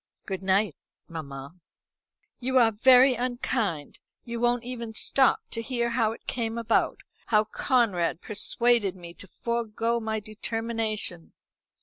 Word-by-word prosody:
"Good 190 -2 -4
night, 190 -3 +1 0.3
mamma." 140 0 -8 0.8
"You 260 +1 +1
are 230 -3 +5
very 255 +4 +6
unkind. 240 - -2 0.2
You 235 -1 -5
won't 240 0 +1
even 235 -2 -6
stop 265 +3 +3
to 230 - -3
hear 235 -1 -1
how 230 -2 +2
it 225 - -11
came 230 -1 -3
about 230 -1 +1 0.3
how 215 -2 +4
Conrad 210 -8 +1
persuaded 215 -1 +1
me 170 -2 -10
to 200 - -11
forego 235 +2 -2
my 220 -1 -2
determination." 215 -4 -3
225 Hz, 125 wpm, -27 LUFS, 200-240 Hz, 0.8 s, very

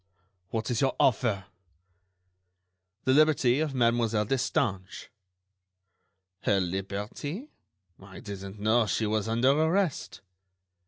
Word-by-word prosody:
what 110 0 -3
is 115 - 0
your 135 -1 +1
offer?" 110 -6 +2 1.6
"The 130 - +3
liberty 145 -3 +4
of 155 -3 -1
Mademoiselle 115 -3 +2
Destange." 115 -6 -2 1.3
"Her 100 -1 +1
liberty?... 100 - -4 0.5
I 95 -1 -12
didn't 100 -1 -8
know 110 +2 +2
she 110 - 0
was 105 0 -1
under 120 +4 +3
arrest." 160 +3 0
115 Hz, 100 wpm, -28 LUFS, 100-135 Hz, 1.6 s, liberty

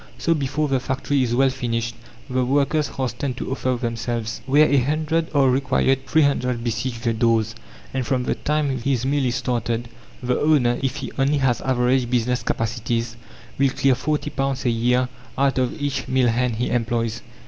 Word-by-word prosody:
So, 165 - +2
before 150 0 -1
the 135 -2 +1
factory 135 +1 -1
is 120 -2 +1
well 135 +1 +4
finished, 115 -3 -2 0.3
the 130 -1 0
workers 145 +3 +1
hasten 130 -1 -3
to 130 - -5
offer 130 -1 0
themselves. 115 -1 -3
Where 145 +3 +5
a 140 - +3
hundred 155 +4 0
are 140 -3 +4
required 130 0 +1
three 155 +3 +4
hundred 125 -4 0
besiege 115 +1 -2
the 115 -2 0
doors, 110 -1 +2 0.4
and 130 - -1
from 130 0 0
the - - 0
time 145 -3 -1
his 130 0 0
mill 140 +1 +1
is 120 -1 0
started, 120 -2 -2 0.3
the 125 0 0
owner, 130 -6 +3
if 135 0 -1
he 140 -2 -5
only 140 +2 +3
has 130 -5 +1
average 125 -1 +1
business 125 0 +1
capacities, 115 0 -2 0.4
will 140 0 +4
clear 135 +1 +2
£40 135 -1 -2
a - - +3
year 125 +2 +2 0.3
out 135 0 +2
of 130 +3 -1
each 145 -1 -2
mill 130 -2 +3
hand 120 0 0
he 120 +3 -1
employs. 115 -1 -1
130 Hz, 180 wpm, -22 LUFS, 120-140 Hz, 0.4 s, Where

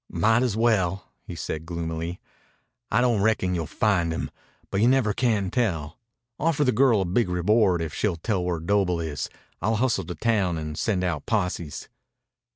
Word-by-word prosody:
"Might 115 +2 +3
as 120 -5 0
well," 100 -5 +1 0.2
he - - -6
said 80 +1 -5
gloomily. 85 0 -4 0.7
"I - - +3
don't 120 -5 +2
reckon 100 -4 +2
you'll 85 -3 -2
find 90 -6 +1
him. 80 - -3 0.4
But 100 - 0
you 115 - +5
never 125 -5 +3
can 105 -6 +1
tell. 85 - -1 0.4
Offer 155 -1 +2
the 130 - +3
girl 125 -6 +4
a - - 0
big 95 +3 +1
reward 90 0 +2
if 80 - -5
she'll 105 -5 0
tell 90 +2 -1
where 90 -2 -1
Doble 90 0 +1
is. 80 -3 -3 0.3
I'll 110 +5 +1
hustle 125 +2 +1
to 90 - -6
town 100 -3 +1
and 75 -1 -5
send 95 +1 0
out 85 -5 -2
posses." 90 -8 -2
95 Hz, 175 wpm, -25 LUFS, 85-115 Hz, 0.7 s, you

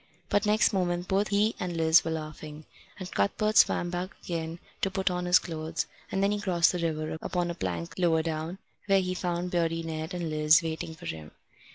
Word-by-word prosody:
But 205 +1 +2
next 210 0 +3
moment 175 -2 0
both 200 +2 +1
he 210 +2 +2
and 175 -2 -3
Liz 160 +1 +5
were 165 - -3
laughing, 155 -1 -6 0.3
and 185 -2 -7
Cuthbert 215 - 0
swam 175 -4 +4
back 180 +1 -3
again 165 -1 -4 0.2
to 195 - +2
put 190 0 0
on 180 0 -2
his 180 0 +6
clothes; 160 -1 -3 0.3
and 195 - 0
then 200 - +3
he 205 0 -1
crossed 175 -4 +3
the 180 - -3
river 160 -1 -2
upon 175 -1 -1
a - - -3
plank 85 - -4
lower 165 -3 +3
down, 160 +2 -3 0.3
where 195 -1 +5
he 185 0 -2
found 180 -1 -2
Beardy 165 -1 0
Ned 160 +2 -4
and 170 -3 -3
Liz 155 +2 +5
waiting 160 0 -4
for - - -12
him. 80 -1 -6
170 Hz, 205 wpm, -28 LUFS, 160-185 Hz, 0.3 s, his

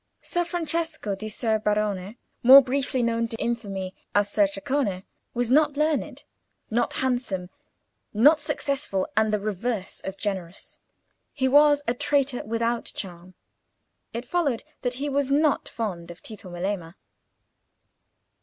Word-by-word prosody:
Ser 350 - 0
Francesco 330 - -2
di 215 +3 -5
Ser 220 0 0
Barone, 210 0 -1 0.2
more 270 +3 +10
briefly 260 -1 0
known 230 0 +1
to 225 -1 -4
infamy 200 -6 -3 0.2
as 205 0 +3
Ser 305 +5 +4
Ceccone, 285 -10 -1 0.3
was 245 0 0
not 295 0 +4
learned, 305 0 0 0.5
not 235 +2 +1
handsome, 245 -9 -1 0.6
not 290 +9 +6
successful, 270 -9 -1
and 220 0 +3
the 210 - +1
reverse 210 0 -3
of 190 0 -6
generous. 190 -4 -4 0.5
He 265 -3 +1
was 290 +1 +5
a 235 - +2
traitor 275 0 +1
without 230 +1 -1
charm. 180 -1 -7 0.8
It 235 +2 -5
followed 285 -6 0 0.2
that 245 0 -1
he 280 +3 -3
was 280 -1 0
not 295 +1 +2
fond 180 -7 -4
of 175 - -11
Tito 210 -4 -10
Melema. 175 -1 -4
235 Hz, 135 wpm, -25 LUFS, 200-280 Hz, 0.8 s, more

